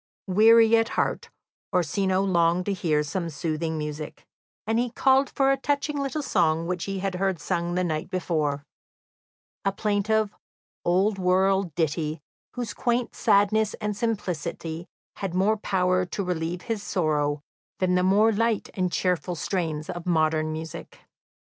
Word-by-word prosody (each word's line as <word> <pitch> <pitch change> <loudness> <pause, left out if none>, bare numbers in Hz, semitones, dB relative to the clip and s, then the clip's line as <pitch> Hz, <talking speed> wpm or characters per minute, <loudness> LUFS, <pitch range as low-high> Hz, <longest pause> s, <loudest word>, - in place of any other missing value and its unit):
Weary 225 +4 +6
at 225 0 +1
heart, - - -1 0.4
Orsino 185 +2 +1
longed 175 -1 +2
to 200 - 0
hear 155 -5 +1
some 170 +3 -3
soothing 160 +1 -2
music, 150 0 -6 0.4
and 225 +1 +1
he 245 0 0
called 265 +3 +3
for 270 0 +2
a 275 - +2
touching 285 +2 -1
little 285 +2 -2
song 165 -8 +1
which 180 0 -2
he 195 -1 -3
had 195 0 -2
heard 190 -1 -1
sung 170 +3 -2
the 180 - +1
night 155 -1 -2
before 155 -6 -1 1.0
a 195 - +2
plaintive, 210 +1 0 0.5
old 195 +3 +2
world 190 -2 +2
ditty, 155 -1 -1 0.4
whose 245 -3 -4
quaint 240 0 -1
sadness 215 0 +2
and 210 -1 -3
simplicity 175 -6 -3 0.3
had 190 -3 -4
more 200 +4 +3
power 185 -3 +1
to 200 - -3
relieve 175 0 -3
his 225 -3 -3
sorrow 150 -6 0 0.3
than 185 -1 +1
the 180 - +3
more 205 +4 +4
light 225 0 0
and 185 -2 -1
cheerful 180 -1 0
strains 160 -3 -2
of 175 0 -6
modern 155 -2 +2
music. 160 0 -7
185 Hz, 150 wpm, -26 LUFS, 165-210 Hz, 1.0 s, Weary